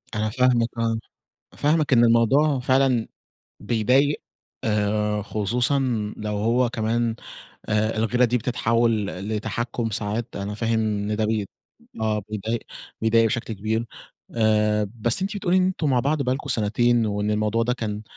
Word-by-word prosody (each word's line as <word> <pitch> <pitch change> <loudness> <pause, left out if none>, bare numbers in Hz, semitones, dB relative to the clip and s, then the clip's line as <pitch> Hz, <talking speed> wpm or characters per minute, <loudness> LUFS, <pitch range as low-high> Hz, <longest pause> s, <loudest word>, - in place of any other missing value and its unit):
أنا 110 0 0
فاهمكِ 120 0 +2
آه، 115 -1 0 0.6
فاهمكِ 150 -1 +2
إن 120 -1 +6
الموضوع 130 +5 +3
فعلًا 130 -2 +2 0.5
بيضايق 125 +6 +2 0.4
آآ، 105 0 0
خصوصًا 120 +7 0 0.4
لو 105 0 -4
هو 120 +4 +2
كمان 115 0 -1 0.5
آآ، 110 +1 +1
الغِيرة 120 +3 +2
دي 120 +1 +1
بتتحوّل 115 -1 +1
ل 95 +1 -6
لتحكم 120 +2 -3
ساعات. 105 +3 -3
أنا 100 +1 -4
فاهم 115 +1 0
إن 105 -1 -1
ده 110 0 0
بـي 105 -2 -1 0.5
آه، 110 -1 0
بيضايق 110 +2 -3 0.4
بيضايق 115 +1 +4
بشكل 115 +1 -2
كبير 110 +3 -2 0.5
آآ، 105 -2 +2
بس 120 - +2
أنتِ 195 +2 -2
بتقولي 185 -2 +1
إن 185 - +3
أنتم 175 -5 -1
مع 125 -2 +3
بعض 145 +3 0
بقى 125 -1 0
لكم 140 +1 -7
سنتين، 120 0 +2
وإن 105 0 -1
الموضوع 110 +2 +1
ده 125 - 0
كان 105 -4 -4
115 Hz, 150 wpm, -23 LUFS, 105-125 Hz, 0.6 s, إن